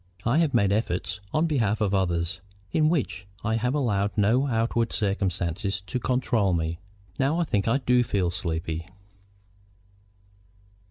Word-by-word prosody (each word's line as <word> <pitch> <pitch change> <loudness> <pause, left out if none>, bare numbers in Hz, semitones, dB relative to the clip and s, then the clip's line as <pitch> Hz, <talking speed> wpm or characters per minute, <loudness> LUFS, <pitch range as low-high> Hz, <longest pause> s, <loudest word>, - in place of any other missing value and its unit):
I 120 +7 +3
have 155 -6 +2
made 100 -4 +3
efforts 95 -3 -1
on 155 +2 +2
behalf 115 -9 +1
of 105 -2 +1
others, 90 -1 0 0.3
in 155 -1 +3
which 135 - -1 0.2
I 110 - 0
have 125 +4 0
allowed 105 -8 +1
no 115 +7 +3
outward 115 -1 0
circumstances 95 -2 -1
to 125 - -3
control 120 -6 +1
me. 80 0 -2 0.4
Now 145 +6 +2
I - - +3
think 105 - 0
I 115 +4 +3
do 125 -2 +3
feel 95 -6 0
sleepy." 80 -1 -3
105 Hz, 145 wpm, -26 LUFS, 95-125 Hz, 0.4 s, I